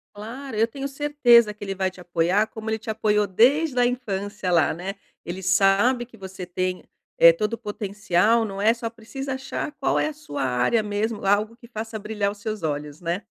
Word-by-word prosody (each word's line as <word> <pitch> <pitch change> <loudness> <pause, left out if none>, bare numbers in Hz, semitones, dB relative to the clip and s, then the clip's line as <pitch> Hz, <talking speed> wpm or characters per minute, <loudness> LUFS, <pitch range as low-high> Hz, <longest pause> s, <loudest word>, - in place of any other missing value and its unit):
Claro, 230 +3 -7
eu 225 +1 +3
tenho 275 +3 -5
certeza 270 -6 +4
que 205 - -11
ele 195 -1 -3
vai 190 -1 0
te 180 - -14
apoiar, 175 +4 +1
como 220 0 -7
ele 220 - -1
te 220 - -9
apoiou 210 -1 +1
desde 255 - +3
a 245 - +5
infância 205 -5 -2
lá, 170 -2 +3
né, 185 +4 -5 0.3
ele 185 +2 -6
sabe 195 +7 +3
que 230 -1 -18
você 190 -1 -8
tem, 185 0 -2 0.3
eh, 170 - +9
todo 210 +6 -2
o 230 - -2
potencial, 210 0 +1
não 195 -2 -5
é, 225 +2 +5
só 230 -1 -4
precisa 260 +4 -6
achar 270 +2 -4
qual 275 - +1
é - - +1
a 310 - -4
sua 290 - -6
área 125 - +2
mesmo, 210 +1 -2
algo 210 +3 +2
que 235 -1 -16
faça 220 -1 -6
brilhar 205 -1 -2
os 205 - -12
seus 215 -2 -5
olhos, 150 -1 -3
né? 175 +4 -2
210 Hz, 205 wpm, -24 LUFS, 190-235 Hz, 0.3 s, eh